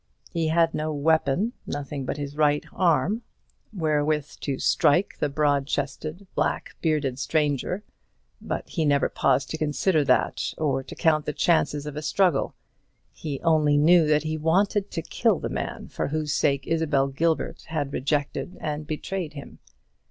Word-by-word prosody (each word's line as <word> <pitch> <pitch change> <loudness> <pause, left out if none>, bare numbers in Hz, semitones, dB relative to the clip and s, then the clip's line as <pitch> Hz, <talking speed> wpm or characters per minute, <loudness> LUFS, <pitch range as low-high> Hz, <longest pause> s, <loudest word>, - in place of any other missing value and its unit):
He 165 -2 0
had 165 +1 +3
no 155 +1 -2
weapon, 160 - +1
nothing 140 -1 -4
but - - -3
his 145 0 -5
right 150 -1 +2
arm, 180 - +2 0.5
wherewith 150 -5 0
to 140 -2 -2
strike 175 +9 +2
the 150 - +1
broad 145 -1 +1
chested 155 +6 -3
black - - -1
bearded 145 -5 0
stranger. 150 +6 0 0.6
But - - -4
he 165 - -2
never 145 -2 +3
paused 135 0 +1
to 160 - -4
consider 155 +2 +2
that, 130 -2 +1
or 140 -4 0
to 135 - -10
count 155 -3 +2
the 150 - -1
chances 150 -3 +1
of 150 -1 -6
a 150 - -4
struggle. 170 -1 +1 0.6
He 145 -4 -5
only 155 -3 +3
knew 165 +2 +5
that 150 0 +3
he 155 0 -2
wanted 195 +5 +2
to 165 - -4
kill - - +1
the - - -4
man - - -4
for - - -3
whose 155 0 -1
sake 140 -2 +1
Isabel 155 -4 +1
Gilbert 160 +4 -1
had 145 -3 -3
rejected 145 +5 -2
and 150 -1 -4
betrayed 160 +1 -4
him. 140 -2 -10
150 Hz, 160 wpm, -25 LUFS, 145-160 Hz, 0.6 s, knew